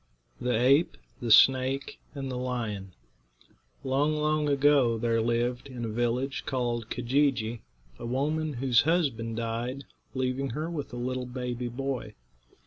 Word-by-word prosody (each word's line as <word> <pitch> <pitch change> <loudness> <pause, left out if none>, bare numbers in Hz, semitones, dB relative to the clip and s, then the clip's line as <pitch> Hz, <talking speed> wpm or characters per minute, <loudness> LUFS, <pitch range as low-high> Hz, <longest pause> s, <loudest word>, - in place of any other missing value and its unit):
THE 125 -2 0
APE, 135 +7 +4 0.2
THE 120 - -3
SNAKE, 130 +4 +4 0.2
AND 135 -2 -4
THE - - -3
LION. 115 -7 -3 0.9
Long, 140 +3 +1
long 150 0 +1
ago 140 -4 +4
there 115 0 +1
lived, 120 +3 0
in 125 -3 -5
a - - -3
village 120 +4 -1
called 120 -3 -1
Keejee'jee, 125 -3 0 0.4
a - - -5
woman 150 +5 -1
whose 125 -2 +3
husband 135 -9 0
died, 115 +4 -3 0.3
leaving 130 +1 -1
her 160 +2 -2
with 150 -4 -5
a - - -7
little 125 +1 -3
baby 125 -1 -4
boy. 125 -3 -4
125 Hz, 135 wpm, -28 LUFS, 120-140 Hz, 0.9 s, APE